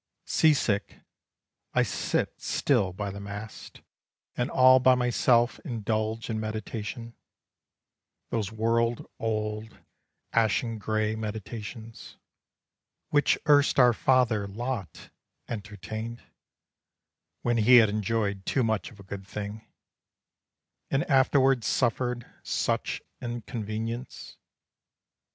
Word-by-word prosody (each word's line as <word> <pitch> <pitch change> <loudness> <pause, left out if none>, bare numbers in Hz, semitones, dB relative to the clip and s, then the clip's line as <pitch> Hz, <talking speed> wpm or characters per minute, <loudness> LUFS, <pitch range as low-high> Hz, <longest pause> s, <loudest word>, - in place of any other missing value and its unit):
Sea 155 -2 +4
sick 105 -6 -1 0.8
I - - +5
still - - 0
sit 100 -9 0
by 100 -1 -3
the 100 - -7
mast 100 +2 -9 0.5
And 120 +2 -1
all 130 0 +6
by 130 0 +5
myself 120 0 +2
indulge 110 - -2
in 110 -2 -2
meditation, 110 +1 -5 1.2
Those 110 -3 -1
world 115 +1 0
old 110 0 -3 0.6
ashen 115 0 +1
gray 110 +1 0
meditations, 110 +1 -7 0.9
Which 145 -1 +3
erst 145 -1 +5
our 125 -3 +6
father 120 -5 +2
Lot 115 -1 -5 0.4
entertained, 110 +2 -6 1.2
When 120 -1 +1
he 115 +3 +6
had 110 -3 +6
enjoyed 105 -1 -1
too 130 - +2
much 110 -2 0
of 110 - -17
a - - -11
good 95 0 -8
thing, 105 +1 -6 1.2
And 135 +3 +1
afterward 135 -2 +4
suffered 125 0 0 0.2
such - - -1 0.2
inconvenience. 115 0 -5
115 Hz, 100 wpm, -27 LUFS, 105-120 Hz, 1.2 s, all